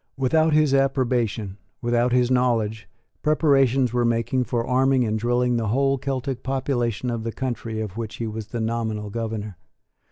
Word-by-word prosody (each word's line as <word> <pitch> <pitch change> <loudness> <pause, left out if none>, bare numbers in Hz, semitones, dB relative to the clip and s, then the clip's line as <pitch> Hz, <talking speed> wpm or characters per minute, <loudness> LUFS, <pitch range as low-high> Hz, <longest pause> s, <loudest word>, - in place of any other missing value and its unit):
Without 155 +5 +2
his 150 -2 +3
approbation, 120 -7 0 0.2
without 120 +1 +1
his 125 0 +2
knowledge, 115 -4 +1 0.3
preparations 135 -5 +3
were 120 -1 +2
making 115 +2 +1
for 115 +1 -1
arming 130 0 +3
and 110 0 -1
drilling 120 +1 +1
the 115 -1 -1
whole 135 +4 +1
Celtic 135 -1 -3
population 125 -3 -1
of 115 -1 -3
the 115 - -3
country 115 -3 -4
of 105 -2 -5
which 115 -2 -5
he 115 - -4
was 110 -1 -5
the 115 +1 -4
nominal 110 -2 -2
governor. 110 -4 -4
120 Hz, 160 wpm, -23 LUFS, 110-130 Hz, 0.3 s, his